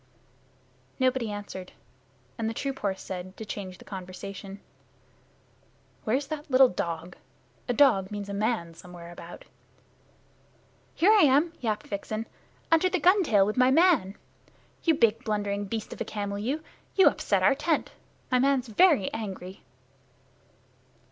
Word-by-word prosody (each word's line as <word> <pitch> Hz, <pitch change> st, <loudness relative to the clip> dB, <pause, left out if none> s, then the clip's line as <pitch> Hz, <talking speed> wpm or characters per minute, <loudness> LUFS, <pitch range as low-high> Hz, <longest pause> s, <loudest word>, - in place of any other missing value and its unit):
Nobody 255 Hz, -3 st, +1 dB
answered, 200 Hz, -3 st, -7 dB, 0.6 s
and 225 Hz, -2 st, -2 dB
the 225 Hz, -, -5 dB
troop 275 Hz, +1 st, -3 dB
horse 195 Hz, -2 st, -2 dB
said, 185 Hz, 0 st, -7 dB
to 220 Hz, -, -7 dB
change 190 Hz, -3 st, -6 dB
the -, -, -16 dB
conversation, 195 Hz, +1 st, -8 dB, 1.5 s
"Where's 260 Hz, +6 st, +1 dB
that 300 Hz, +1 st, -6 dB
little 260 Hz, -1 st, +6 dB
dog? 170 Hz, -1 st, -4 dB, 0.5 s
A -, -, +2 dB
dog 230 Hz, -9 st, +4 dB
means 205 Hz, -1 st, -5 dB
a 200 Hz, -, -5 dB
man 205 Hz, -5 st, -1 dB
somewhere 175 Hz, 0 st, -11 dB
about." 175 Hz, 0 st, -11 dB, 1.5 s
"Here 375 Hz, +6 st, +5 dB
I 430 Hz, -2 st, +6 dB
am," 295 Hz, +3 st, +4 dB
yapped 215 Hz, -3 st, -2 dB
Vixen, 215 Hz, +2 st, -4 dB, 0.5 s
"under 330 Hz, +3 st, +4 dB
the 365 Hz, -, 0 dB
gun 365 Hz, +6 st, +5 dB
tail 210 Hz, -, +4 dB
with 210 Hz, +3 st, -2 dB
my 255 Hz, 0 st, +5 dB
man. 270 Hz, -, +4 dB, 0.7 s
You 325 Hz, -2 st, +3 dB
big, 230 Hz, -2 st, +2 dB
blundering 205 Hz, -2 st, -2 dB
beast 220 Hz, +2 st, -5 dB
of -, -, -10 dB
a -, -, -1 dB
camel 205 Hz, -1 st, -4 dB
you, 275 Hz, +9 st, -2 dB, 0.3 s
you 385 Hz, -, +6 dB
upset -, -, +1 dB
our 285 Hz, -, +6 dB
tent. 300 Hz, +3 st, -1 dB, 0.4 s
My 250 Hz, -, +4 dB
man's 265 Hz, -2 st, +2 dB
very 275 Hz, -, +4 dB
angry." 190 Hz, -3 st, -6 dB
220 Hz, 140 wpm, -27 LUFS, 195-275 Hz, 1.5 s, little